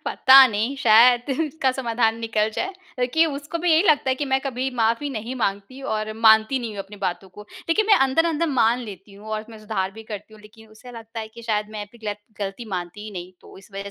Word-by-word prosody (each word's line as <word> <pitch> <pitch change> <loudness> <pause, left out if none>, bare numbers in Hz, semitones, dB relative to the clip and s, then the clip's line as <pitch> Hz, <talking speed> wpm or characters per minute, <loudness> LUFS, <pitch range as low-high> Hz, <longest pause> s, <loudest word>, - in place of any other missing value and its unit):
पता 265 0 +7
नहीं, 225 +4 -2
शायद 240 +1 +5
इसका 300 -4 0
समाधान 230 -3 0
निकल 220 -1 -1
जाए 380 +1 -2 0.3
लेकि 255 +7 +2
उसको 295 +3 -5
भी 350 0 0
यही 315 - +5
लगता 300 -7 +3
है - - +2
कि 290 - -2
मैं 265 -1 0
कभी 265 -1 -3
माफ़ी 230 +5 0
नहीं 235 +1 -5
माँगती 205 +4 -3
और 215 0 -3
मानती 220 +3 +4
नहीं 235 -3 -5
हूँ - - -8
अपनी 205 +1 -13
बातों 190 0 -4
को। 210 +3 -12 0.3
लेकिन 415 +6 +2
मैं 425 - +6
अंदर-अंदर 325 +3 +1
मान 240 -3 +2
लेती 200 -3 -10
हूँ 205 +2 -14
और 215 0 -3
मैं 220 - -11
सुधार 205 -3 -3
भी 225 +1 -11
करती 215 0 -9
हूँ, 215 - -16
लेकिन 220 +1 -17
उसे 220 +3 -14
लगता 225 0 -8
है 220 - -7
कि 235 - -11
शायद 210 -2 -1
मैं 210 -1 -6
अप 220 +4 -19
गिलत 210 -2 -4 0.2
गलती 200 +3 -5
मानती 180 +4 -6
ही 215 - -7
नहीं, 180 -1 -8
तो - - -16
इस 195 +2 -18
वज़ह 200 +1 -6
225 Hz, 235 wpm, -23 LUFS, 210-265 Hz, 0.3 s, पता